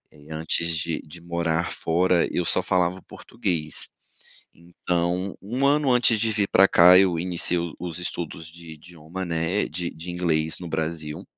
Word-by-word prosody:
Eh, 75 Hz, 0 st, -18 dB
antes 80 Hz, +1 st, 0 dB
de 80 Hz, 0 st, -2 dB
de 80 Hz, +3 st, -11 dB
morar 85 Hz, -1 st, -1 dB
fora, 85 Hz, +1 st, +1 dB
eu 90 Hz, -, -1 dB
só 95 Hz, -, +3 dB
falava 90 Hz, -1 st, 0 dB
o -, -, -22 dB
português. 85 Hz, -, -2 dB, 0.7 s
Então, 85 Hz, +2 st, -3 dB
1 125 Hz, +7 st, -2 dB
ano 145 Hz, -1 st, +3 dB
antes 120 Hz, -2 st, +3 dB
de 110 Hz, 0 st, +1 dB
vir 105 Hz, -2 st, 0 dB
pra 95 Hz, +1 st, +6 dB
cá, 90 Hz, 0 st, +7 dB
eu 90 Hz, -4 st, +2 dB
iniciei 90 Hz, 0 st, +1 dB
o 85 Hz, -1 st, -3 dB
os 85 Hz, -2 st, -5 dB
estudos 85 Hz, -2 st, -6 dB
de 85 Hz, -1 st, -12 dB
idioma, 85 Hz, +3 st, -9 dB
né, 85 Hz, +4 st, -1 dB
de 85 Hz, +2 st, -3 dB
de 85 Hz, +3 st, -7 dB
inglês 80 Hz, -3 st, -1 dB
no 90 Hz, -, -7 dB
Brasil, 80 Hz, -1 st, -4 dB
85 Hz, 170 wpm, -24 LUFS, 80-90 Hz, 0.7 s, cá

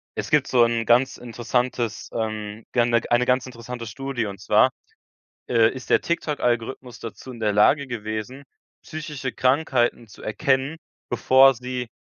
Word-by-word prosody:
es -, -, -4 dB
gibt -, -, +3 dB
so 125 Hz, -2 st, +4 dB
'n 115 Hz, -1 st, +1 dB
ganz 125 Hz, +3 st, +3 dB
interessantes, 120 Hz, -1 st, -2 dB
ähm, 110 Hz, -1 st, -4 dB
ge 120 Hz, -, +2 dB, 0.3 s
eine 120 Hz, +1 st, +4 dB
ganz 125 Hz, 0 st, +2 dB
interessante 120 Hz, -1 st, -8 dB
Studie. 135 Hz, 0 st, -4 dB
Und 100 Hz, -2 st, -7 dB
zwar, -, -, +4 dB, 0.8 s
äh, 115 Hz, -2 st, +4 dB
ist 130 Hz, -2 st, -9 dB
der -, -, +5 dB
TikTok 160 Hz, -3 st, -2 dB
Algorithmus 120 Hz, +1 st, -2 dB
dazu 115 Hz, +3 st, -8 dB
in 115 Hz, -, -11 dB
der 105 Hz, -1 st, +2 dB
Lage 135 Hz, +7 st, +4 dB
gewesen, 110 Hz, +3 st, -5 dB, 0.4 s
psychische 150 Hz, -4 st, -6 dB
Krankheiten 130 Hz, -3 st, +1 dB
zu 105 Hz, -, -15 dB
erkennen, 130 Hz, +7 st, 0 dB, 0.3 s
bevor 135 Hz, +1 st, +5 dB
sie 125 Hz, 0 st, -5 dB
120 Hz, 150 wpm, -23 LUFS, 115-130 Hz, 0.8 s, der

